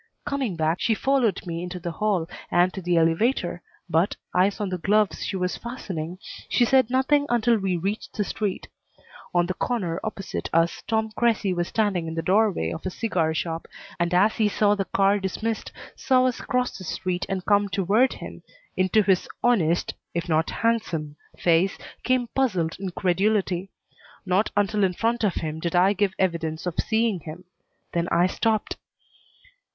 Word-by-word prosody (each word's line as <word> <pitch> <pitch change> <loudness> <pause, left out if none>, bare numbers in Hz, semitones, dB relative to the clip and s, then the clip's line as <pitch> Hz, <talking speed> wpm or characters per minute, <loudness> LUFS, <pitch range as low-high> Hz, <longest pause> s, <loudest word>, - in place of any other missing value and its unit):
Coming 275 -9 -1
back, 160 +1 0
she 225 - +2
followed 250 -6 +1
me 170 -1 -4
into 180 +1 -5
the 175 -1 -4
hall 185 -2 0 0.2
and 175 +1 +3
to 190 - -5
the 175 -1 +1
elevator, 175 +3 +1 0.3
but, 170 +3 +1 0.2
eyes 190 +4 +2
on 205 -2 -1
the 185 -1 -3
gloves 210 +3 +2
she - - -3
was 180 -1 -1
fastening, 185 -9 -5 0.3
she 245 - +3
said 260 -1 +4
nothing 285 +3 +2
until 235 -1 +3
we 190 -2 0
reached 195 +5 -3
the 210 - +2
street. 205 -1 -3 0.6
On 175 -1 +3
the 185 - -2
corner 185 -7 -2
opposite 205 -3 -4
us 165 +1 +2
Tom 220 -1 0
Cressy 220 -5 +2
was 175 -1 -1
standing 200 -7 0
in 160 - -5
the 165 - -2
doorway 195 - +2
of - - -6
a 185 - -2
cigar 175 -6 -1
shop, 165 0 -3 0.3
and 170 0 +1
as 195 +5 +3
he 215 -2 +3
saw 205 0 +3
the 200 -1 -1
car 195 +2 +2
dismissed, 215 +4 -3 0.2
saw 255 -1 +3
us 255 -2 -1
cross 250 -1 -1
the 185 - -8
street 180 +1 -3
and 190 -1 -3
come 205 -1 +3
toward 205 +7 +2
him, - - -9 0.3
into 185 +3 +3
his 190 -2 +2 0.2
honest, 175 -9 +2 0.2
if 170 +1 -2
not 160 0 +1
handsome, 170 -10 -1 0.2
face 175 +2 +2 0.2
came 255 -1 +1
puzzled 185 -12 0
incredulity. 190 0 0 0.6
Not 190 +3 +2
until 205 0 +2
in 185 -1 +2
front 230 +4 0
of 200 -4 +1
him 155 0 -3
did 170 +1 -2
I 185 +3 +5
give 195 -1 0
evidence 165 -3 -1
of 180 -1 -3
seeing 220 -3 +1
him; 160 +3 -9 0.5
then 170 0 0
I 175 - +3
stopped. 215 +3 0
190 Hz, 175 wpm, -25 LUFS, 175-220 Hz, 0.6 s, I